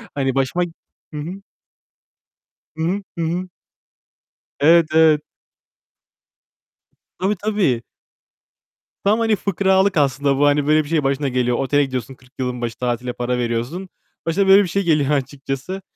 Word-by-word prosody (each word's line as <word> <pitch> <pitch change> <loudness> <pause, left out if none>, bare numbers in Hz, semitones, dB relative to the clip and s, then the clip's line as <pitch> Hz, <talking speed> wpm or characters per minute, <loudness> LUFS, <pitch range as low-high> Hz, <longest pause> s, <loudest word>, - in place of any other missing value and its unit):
hani 135 -2 0
başıma 135 +7 +1 0.5
Hı - - -5
hı. 180 +6 -6 1.4
Hı 160 - -2
hı. 190 +5 0 0.2
Hı 165 - -1
hı. 180 +3 -2 1.1
Evet, 165 +3 +6
evet. 160 -2 +5 2.0
Tabii 195 +3 0
tabii. 190 - 0 1.2
Tam 210 +3 +3
hani 225 -2 +2
fıkralık 190 -1 +1
aslında 140 -1 +2
bu. 145 - +3
Hani 145 0 +2
böyle 155 0 +4
bir 145 - -11
şeyin 160 -3 +1
başına 140 +1 0
geliyor. 125 -1 0
Otele 145 +1 +2
gidiyorsun, 130 -1 -5
40 130 0 -23
yılın 125 -1 -3
başı 115 -1 -4
tatile 125 0 -2
para 125 0 -2
veriyorsun. 120 +10 -3 0.4
Başına 190 +4 +1
böyle 195 +1 +7
bir - - -3
şey 195 +3 -1
geliyor 150 -4 +2
açıkçası. 140 +6 -3
150 Hz, 140 wpm, -20 LUFS, 130-185 Hz, 2.0 s, böyle